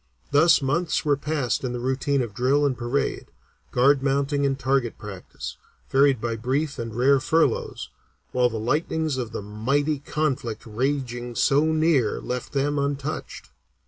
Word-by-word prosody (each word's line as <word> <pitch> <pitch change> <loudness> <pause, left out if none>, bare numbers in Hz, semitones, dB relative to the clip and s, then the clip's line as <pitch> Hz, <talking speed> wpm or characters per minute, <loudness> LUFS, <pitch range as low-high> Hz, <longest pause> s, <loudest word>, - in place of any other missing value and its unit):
Thus 150 +1 +5
months 160 +6 0
were 145 -1 +3
passed 145 -3 -1
in 125 -1 -2
the 125 - -3
routine 130 +2 0
of 110 -4 -6
drill 135 +6 +2
and 135 -2 +1
parade, 120 +3 -2 0.4
guard 135 +2 +4
mounting 140 +1 +1
and 135 -1 -1
target 130 -2 0
practice, 100 -3 -8 0.3
varied 135 -2 +4
by 115 0 -2
brief 135 +5 -1
and 115 -2 -5
rare 135 +3 +4
furloughs, 160 +3 0 0.4
while 125 -1 +3
the 115 - -4
lightnings 150 +5 -1
of 120 -3 -3
the - - -5
mighty 135 +9 0
conflict 135 -7 -2
raging 120 0 -2
so 140 +5 +3
near 155 -7 +2
left 125 0 -5
them 145 +1 +1
untouched. 140 +2 -4
135 Hz, 150 wpm, -24 LUFS, 120-145 Hz, 0.4 s, Thus